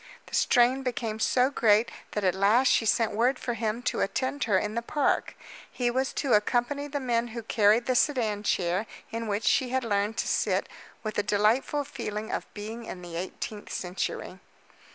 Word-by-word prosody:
The - - -17
strain 250 +2 +4
became 230 -4 -3
so 255 +4 +3
great 220 -3 +3 0.2
that 210 - -2
at 185 -2 +3
last 210 +7 +4
she 225 - +3
sent 225 0 +2
word 245 +5 +2
for 240 - -3
him 225 +1 -2
to - - -1
attend 260 +6 -1
her 205 -4 +3
in 210 +3 -1
the 235 - -1
park. 280 +4 0 0.4
He 245 -1 0
was 260 +2 0
to 275 -4 0
accompany 245 +7 +1
the 285 0 -3
men 240 -3 0
who 230 - -4
carried 215 +2 +3
the 255 - +1
sedan 240 -6 +1
chair 185 0 0 0.2
in 230 0 -4
which 205 +1 -1
she 255 - +2
had 260 +1 0
learned 205 0 0
to - - -1
sit - - +1 0.4
with 215 -2 -2
a - - +4
delightful 220 +8 +1
feeling 220 -5 -5
of - - -4
being 220 +3 -6
in 180 -4 -8
the 175 -1 -8
eighteenth 190 +4 -6
century. 180 +1 -4
230 Hz, 190 wpm, -27 LUFS, 210-250 Hz, 0.4 s, strain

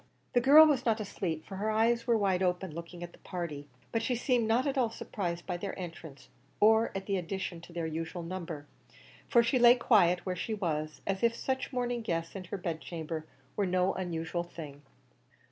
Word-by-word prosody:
The 245 - +4
girl 290 +5 +9
was 285 -5 +2
not 225 -2 +2
asleep, 175 -6 -3
for 195 - -7
her 210 +3 -1
eyes 230 +2 +2
were 235 -1 +4
wide 190 -3 +1
open, 180 -1 0
looking 170 +2 -8
at 175 - -7
the - - -17
party, 155 -5 -5 0.2
but 225 - 0
she 245 +2 0
seemed 245 -2 +1
not 230 +3 +2
at 280 -1 0
all 250 -4 +2
surprised 175 -6 -4
by 180 -2 -2
their 195 +2 -5
entrance, 165 -6 -8 0.3
or 220 +2 +5
at 195 0 -3
the 200 -1 0
addition 180 -1 -4
to 170 - -13
their 170 -1 -3
usual 165 +2 -4
numbers, 165 -4 -6 0.6
for 235 -2 +5
she 235 +2 +2
lay 240 0 +8
quite 240 - -10
quiet 180 -6 +4
where 185 -1 -1
she 215 +5 -3
was, 155 -6 -3
as 195 -1 -1
if 230 0 +3
such 265 +3 -2
morning 245 -2 -1
guests 165 -5 -3
in 190 -1 -6
her 190 - -4
bed 170 -3 -4
chamber 160 -2 -5 0.3
were 200 -2 +1
no 185 +1 +2
unusual 170 -1 -3
thing. 150 -5 -9
185 Hz, 210 wpm, -31 LUFS, 170-230 Hz, 0.6 s, girl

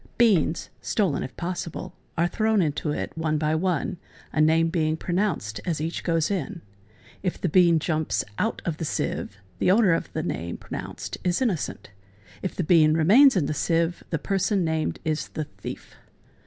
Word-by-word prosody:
Beans 195 -9 +3
(stolen 190 -10 0
if 130 - -7
possible) 175 -1 -4 0.2
are 170 +1 +3
thrown 220 +3 +1
into 150 -2 0
it 150 - -3
one 160 -1 0
by 155 0 +1
one, 175 0 0 0.4
a 155 - +2
name 165 +1 +4
being 160 -2 0
pronounced 175 - -1
as 170 -5 -1
each 160 +2 -3
goesin. 170 +3 -1 0.6
If 180 -2 -2
the - - 0
bean 170 0 +5
jumps 155 -1 0 0.2
out 225 - -1
of 165 -3 -2
the - - -4
sieve, 100 -9 -2 0.2
the - - +2
owner 195 -2 +5
of 165 - -2
the 160 - -2
name 85 - -3
pronounced - - -6
is 180 -1 +1
innocent; 200 - -2 0.5
if 185 - -3
the 180 - -1
bean 155 -2 +5
remains 215 - +6
in 175 -6 +2
the 155 - -1
sieve, 165 +4 0
the 165 - 0
person 195 +2 0
named 160 -1 -1
is 155 0 -1
the 155 - -4
thief. - - -9
165 Hz, 170 wpm, -25 LUFS, 155-185 Hz, 0.6 s, remains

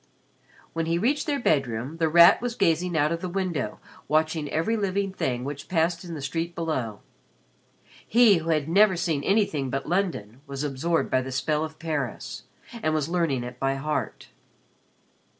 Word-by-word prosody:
When 165 0 -2
he 165 +1 +1
reached 265 - 0
their 290 -2 0
bedroom, 135 - 0
The 165 -1 +1
Rat 170 +2 +7
was 245 -1 -3
gazing 175 -3 +1
out 150 +1 +2
of 170 0 -2
the 185 - -3
window 175 - -2 0.3
watching 155 -1 +1
every 165 +9 0
living 200 -2 -1
thing 125 -8 -2
which 145 +1 -6
passed 170 0 +1
in 170 -2 -7
the 145 - -6
street 165 +5 -3
below. 130 -11 -3 1.1
He 230 -4 +6
who 165 0 -4
had 155 -3 +1
never 195 +3 +5
seen 165 -5 -1
anything 190 -9 +1
but 135 +1 -3
London 150 - -2
was 140 0 -4
absorbed 150 +4 -1
by 130 - +3
the 130 +1 -6
spell 150 +3 0
of 155 0 -6
Paris 150 -6 -4 0.4
and 155 -4 +1
was 155 0 -1
learning 165 -8 0
it 125 0 -8
by 135 0 0
heart. 150 +3 -3
160 Hz, 170 wpm, -26 LUFS, 140-175 Hz, 1.1 s, Rat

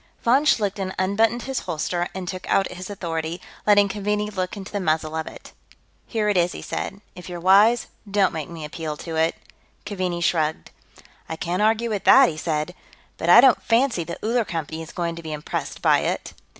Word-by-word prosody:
Von 255 +5 +4
Schlichten 195 -6 +1
unbuttoned 220 +5 +1
his 270 -1 -2
holster 175 +2 -2
and 185 -1 -5
took 185 0 -6
out 195 - +2
his 180 +1 -8
authority, 165 -3 -4 0.3
letting 205 -1 +6
Keaveney 210 +1 -2
look 185 0 -3
into 195 0 -8
the 205 - -2
muzzle 155 -3 0
of 160 -1 -3
it. - - -11 0.5
"Here 220 -3 -1
it 205 -2 +2
is," 175 0 +2
he - - -7
said. 200 - -5
"If 180 0 -10
you're 175 -1 -6
wise, 205 +7 +5 0.2
don't 200 -1 +2
make 160 -2 -5
me 165 -2 -7
appeal 155 0 -5
to 165 +1 -6
it." 160 +1 +1 0.5
Keaveney 185 -4 -3
shrugged. 160 -2 0 0.6
"I 160 - -3
can't 175 +3 -2
argue 225 +2 +2
with 205 -2 -3
that," 270 -1 +8
he 155 - -7
said. 155 +1 -2 0.4
"But - - -2
I - - +10
don't 260 -3 +5
fancy 235 -5 +2
the 170 +1 -6
Uller 235 +2 +2
Company 160 -4 -5
is 160 - -9
going 170 -2 -3
to - - -7
be 160 -1 -6
impressed 150 0 -5
by - - +5
it." - - -3
185 Hz, 200 wpm, -23 LUFS, 165-210 Hz, 0.6 s, I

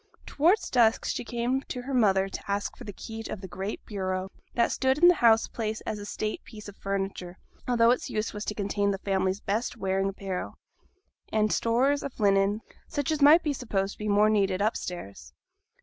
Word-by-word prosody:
Towards 345 +9 +2
dusk 230 -3 +3
she - - -2
came 240 +3 -1
to 250 - -4
her 270 +2 -5
mother 195 -6 +3
to 195 - -7
ask 200 0 -2
for 245 - -11
the 205 - -6
key 225 +3 -8
of - - -5
the 190 - -8
great 190 +3 -5
bureau 190 -2 -3 0.2
that 235 - +2
stood 265 +1 +1
in 345 +3 +6
the 355 - +8
house 225 -1 +5
place 220 -1 -3
as 210 - -4
a 205 - -7
state 215 0 -3
piece 215 -2 -11
of 205 - -10
furniture, 195 -3 -4 0.3
although 235 -1 +4
its 250 - -1
use 215 +1 -2
was 210 0 -5
to 210 - -3
contain 200 0 0
the 195 - 0
family's 190 0 -1
best 220 +4 -2
wearing 195 -1 0
apparel, 195 -2 -5 0.8
and 215 -1 +2
stores 260 +5 +2
of 280 - -7
linen, 200 +1 +3 0.3
such 285 +1 -2
as 310 -2 -1
might 305 +4 +7
be 300 - 0
supposed 200 -7 -2
to - - -19
be 210 0 -3
more 210 +1 +4
needed 195 -3 +1
upstairs. 175 - -4
210 Hz, 200 wpm, -27 LUFS, 195-240 Hz, 0.8 s, the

